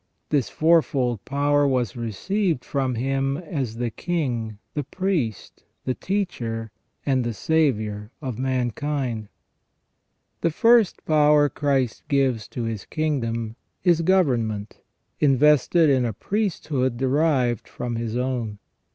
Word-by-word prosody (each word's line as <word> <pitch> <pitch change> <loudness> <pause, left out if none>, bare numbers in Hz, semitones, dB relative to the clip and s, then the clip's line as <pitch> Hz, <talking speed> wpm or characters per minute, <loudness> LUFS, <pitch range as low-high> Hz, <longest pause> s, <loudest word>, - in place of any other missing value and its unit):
This 140 -5 +1
fourfold 140 - +2
power 145 +1 +2
was 125 -6 0
received 155 - -1
from 135 -3 -1
Him 135 +3 0
as 140 -9 -4
the 120 0 -2
King, 120 -10 -2 0.2
the 145 - -2
Priest, 150 - -3 0.2
the 130 - 0
Teacher, 115 - -3 0.3
and 130 -3 +2
the 120 -2 -3
Saviour 110 -8 0
of 130 -6 -5
mankind. 130 -2 -2 1.1
The 170 - +2
first 230 +4 +3
power 150 -1 +4
Christ 135 -6 0
gives 130 -7 +1
to 120 - -5
His 115 -3 -3
kingdom 115 -8 -2 0.3
is 175 -3 +4
government, 120 - +1 0.4
invested 150 +3 +4
in 135 -3 +3
a 115 -2 -1
priesthood 150 - -1
derived 130 -3 +1
from 120 -1 -4
His 115 0 -3
own. 125 -4 -2
130 Hz, 115 wpm, -24 LUFS, 115-150 Hz, 1.1 s, power